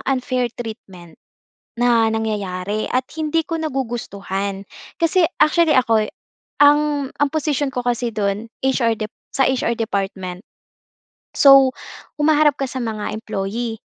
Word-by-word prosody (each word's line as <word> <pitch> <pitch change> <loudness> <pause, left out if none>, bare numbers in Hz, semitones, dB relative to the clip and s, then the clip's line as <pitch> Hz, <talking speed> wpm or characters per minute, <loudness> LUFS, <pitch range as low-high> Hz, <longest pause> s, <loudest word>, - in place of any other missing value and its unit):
unfair 255 -2 0
treatment 190 -8 -9 0.6
na 235 -2 +4
nangyayari 210 -2 -2
at 255 0 0
hindi 320 +1 0
ko 330 -1 -2
nagugustuhan. 200 -8 -3 0.4
Kasi 335 +2 +3 0.2
actually, 305 0 +4
ako'y, 225 -4 +2 0.5
ang 290 -1 +4
ang 290 - +2
posisyon 295 -3 0
ko 250 -1 -3
kasi 245 0 0
dun 205 +1 -1 0.2
HR 255 -4 +2
Dep 215 -1 -4 0.2
sa 270 - +3
HR 250 -2 0
department. 195 -4 -3 1.0
So, 275 -2 +7 0.5
humaharap 300 -1 +4
ka 275 - -1
sa 260 0 -5
mga 220 -2 -3
employee. 220 +2 -4
240 Hz, 120 wpm, -20 LUFS, 215-280 Hz, 1.0 s, So